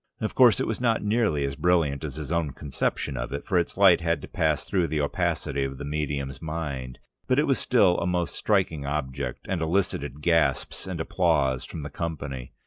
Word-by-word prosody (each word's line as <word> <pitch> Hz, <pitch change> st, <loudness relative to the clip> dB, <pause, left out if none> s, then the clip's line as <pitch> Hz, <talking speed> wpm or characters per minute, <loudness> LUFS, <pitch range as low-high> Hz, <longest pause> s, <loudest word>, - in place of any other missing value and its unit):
Of 110 Hz, -, -2 dB
course 125 Hz, -4 st, +6 dB
it -, -, 0 dB
was 110 Hz, -, -3 dB
not 115 Hz, -3 st, +2 dB
nearly 105 Hz, -9 st, +1 dB
as 70 Hz, 0 st, -3 dB
brilliant 80 Hz, -6 st, +1 dB
as 75 Hz, -4 st, -5 dB
his 75 Hz, 0 st, -6 dB
own 85 Hz, -5 st, 0 dB
conception 70 Hz, -1 st, -2 dB
of -, -, -4 dB
it, 70 Hz, -, -4 dB
for 95 Hz, -3 st, +2 dB
its 85 Hz, -, -2 dB
light 95 Hz, -4 st, +6 dB
had 85 Hz, -2 st, +1 dB
to -, -, -6 dB
pass 80 Hz, -3 st, 0 dB
through 90 Hz, -4 st, +1 dB
the 75 Hz, 0 st, -1 dB
opacity 70 Hz, -1 st, -1 dB
of 70 Hz, 0 st, -4 dB
the 70 Hz, -, -6 dB
medium's 70 Hz, -2 st, -3 dB
mind, 75 Hz, -6 st, -4 dB, 0.3 s
but 130 Hz, -, +2 dB
it 150 Hz, -, +4 dB
was 135 Hz, -, +2 dB
still 100 Hz, -8 st, +3 dB
a 85 Hz, -, -1 dB
most 90 Hz, -1 st, -1 dB
striking 95 Hz, -8 st, 0 dB
object, 70 Hz, -3 st, -3 dB
and 95 Hz, -3 st, -1 dB
elicited 80 Hz, -4 st, -1 dB
gasps 80 Hz, -1 st, +1 dB
of 90 Hz, -3 st, -4 dB
applause 65 Hz, -4 st, +1 dB
from 80 Hz, -, -7 dB
the 75 Hz, -, -6 dB
company. 70 Hz, -6 st, -5 dB
80 Hz, 205 wpm, -26 LUFS, 70-90 Hz, 0.3 s, course